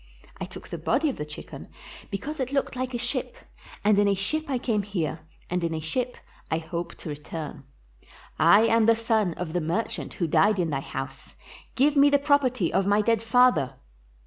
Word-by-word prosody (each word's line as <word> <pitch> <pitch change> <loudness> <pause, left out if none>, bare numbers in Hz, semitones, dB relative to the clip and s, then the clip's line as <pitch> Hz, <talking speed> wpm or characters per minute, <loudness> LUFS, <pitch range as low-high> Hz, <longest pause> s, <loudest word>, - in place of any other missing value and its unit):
I - - -3
took - - -11
the - - -5
body 305 +2 +1
of 270 - -4
the 150 - -5
chicken 150 - -9 0.4
be 200 - -2
cause 300 +7 -6
it 260 0 -2
looks 275 -1 -1
like 255 0 -3
a - - +1
ship, 245 +2 -2 0.5
and 205 -1 +4
in 205 - +4
a 200 - +3
ship 310 +12 -1
I 265 - +1
came 225 -4 0
here 175 -6 -3 0.3
and 180 0 -2
in 165 -1 -1
a - - -2
ship 245 +11 -2 0.3
I 160 - +1
hope 170 +1 -5
to - - -8
return. 150 -1 -7 0.7
I 205 - +7
am 230 0 +4
the 230 - +6
son 220 -5 0
of 170 -3 -5
the 175 - 0
merchant 170 +9 -2
who 175 - -1
died 200 +6 +3
in 170 -3 0
thy 135 - 0
house; 135 0 -7 0.4
give 285 +3 +3
me 285 0 +6
the 285 - +5
property 275 - +2
of 195 - +2
my 205 +1 +4
dead 230 -1 +2
father." 230 - +3
210 Hz, 205 wpm, -26 LUFS, 165-255 Hz, 0.7 s, I